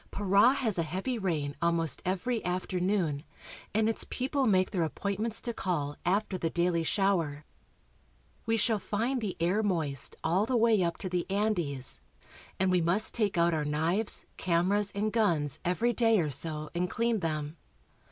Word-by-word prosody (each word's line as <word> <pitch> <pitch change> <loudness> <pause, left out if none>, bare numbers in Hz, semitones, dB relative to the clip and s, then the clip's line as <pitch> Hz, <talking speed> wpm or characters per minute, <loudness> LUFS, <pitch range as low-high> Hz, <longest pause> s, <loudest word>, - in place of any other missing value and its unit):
Para 205 +5 +4
has 225 -9 0
a - - +3
heavy 190 +10 -3
rain 155 -7 -2
almost 170 -2 +1
every 195 +6 -1
afternoon, 180 -3 -1 0.5
and 220 +1 +2
its 225 - +2
people 270 +1 0
make 185 -3 +3
their 185 -5 -1
appointments 200 +7 -2
to 235 - -3
call 150 -9 -2
after 190 +1 0
the 165 - -1
daily 170 0 +1
shower. 165 -6 0 1.0
We 225 0 +2
shall 220 0 +1
find 235 +6 -1
the 205 -4 -4
air 180 +6 +1
moist 160 -9 -1
all 185 +7 +1
the 255 - +1
way 225 -4 +4
up 170 -1 -1
to - - -2
the 180 0 -2
Andes, 175 - 0 0.6
and 190 0 +2
we 180 -1 +3
must 180 +6 +1
take 210 -6 0
out 170 0 +3
our 155 -2 0
knives, 160 +8 0
cameras, 190 +4 +1
and 210 +1 -1
guns 160 - +1
every 225 +7 +1
day 225 -2 +3
or 155 -4 0
so 155 +1 +1
and 180 +1 -1
clean 230 0 0
them. 155 -2 -3
185 Hz, 165 wpm, -29 LUFS, 165-215 Hz, 1.0 s, Para